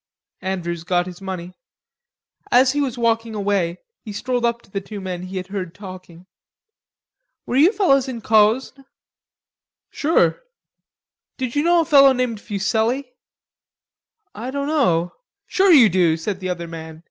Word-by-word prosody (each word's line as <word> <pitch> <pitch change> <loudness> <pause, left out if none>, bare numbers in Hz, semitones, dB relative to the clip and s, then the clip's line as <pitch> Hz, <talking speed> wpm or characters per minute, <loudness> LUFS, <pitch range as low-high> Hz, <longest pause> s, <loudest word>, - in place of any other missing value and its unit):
Andrews 175 -3 -3
got 175 0 0
his 180 0 -10
money. 185 -2 -6 1.0
As 255 +1 +5
he 290 +1 -1
was 260 -4 -2
walking 230 -1 0
away, 195 -4 0 0.3
he 215 - -7
strolled 245 +4 -2
up 235 0 -1
to - - -23
the 195 - -3
two 205 +1 -8
men 185 -2 -5
he 185 +1 -6
had 185 - -4
heard 185 -3 -5
talking. 185 -3 -11 1.2
"Were - - -3
you 310 +8 +6
fellows 275 - +2
in 245 -3 -5
Cosne?" 225 +6 +2 1.1
"Sure." 325 +10 +1 1.0
"Did 255 -1 -4
you 290 - +2
know 340 +2 +4
a - - -2
fellow 275 -4 +6
named 250 -4 -2
Fuselli?" 225 +6 -1 1.2
"I 240 +4 -6
dunno...." 270 - 0 0.3
"Sure, 385 0 +3
you 270 -9 +8
do," 175 -4 +2
said 185 +4 -4
the 185 -1 -4
other 170 -1 -4
man. 160 -1 -9
215 Hz, 145 wpm, -21 LUFS, 185-260 Hz, 1.2 s, you